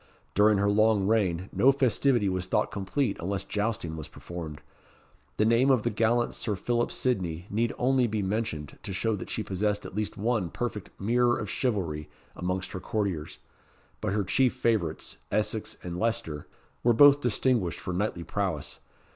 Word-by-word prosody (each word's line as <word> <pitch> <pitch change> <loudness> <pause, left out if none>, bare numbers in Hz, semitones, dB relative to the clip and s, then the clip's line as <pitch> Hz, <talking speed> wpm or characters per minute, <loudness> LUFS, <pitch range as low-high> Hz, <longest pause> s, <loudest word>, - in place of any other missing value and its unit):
During 105 +1 +5
her 100 +1 +2
long 110 -1 +3
reign 95 -4 +1
no 135 - +5
festivity 130 -4 +2
was 95 -1 -1
thought - - +1
complete 105 +7 -1
unless 95 +3 -2
jousting 105 -6 -2
was 80 -2 -6
performed. 80 -4 -8 0.8
The 105 - +3
name 115 +4 +4
of 130 -5 +4
the - - 0
gallant 115 +3 +1
Sir 110 -3 -2
Philip 120 +5 0
Sidney 90 -9 -1
need 115 +3 +1
only 130 0 +3
be 110 -2 -1
mentioned, 95 -8 -3
to 100 - -5
show 110 +4 0
that 95 - -7
she 110 - -2
possessed 105 +1 -1
at - - -8
least 105 +1 -3
one 105 -4 0
perfect 110 -2 -4
"mirror 120 +4 +2
of - - -4
chivalry" 85 - -1 0.3
amongst 90 +1 -3
her 95 - -5
courtiers; 95 -7 -3 0.6
but 105 - -1
her 105 0 +1
chief 125 +7 +2
favourites, 105 -9 -1
Essex 105 0 -1
and 90 0 -5
Leicester, 80 -10 -1 0.3
were 120 - +4
both 145 +4 +7
distinguished 110 - +1
for 90 - -4
knightly 90 -2 -1
prowess. - - -3
105 Hz, 165 wpm, -28 LUFS, 90-115 Hz, 0.8 s, both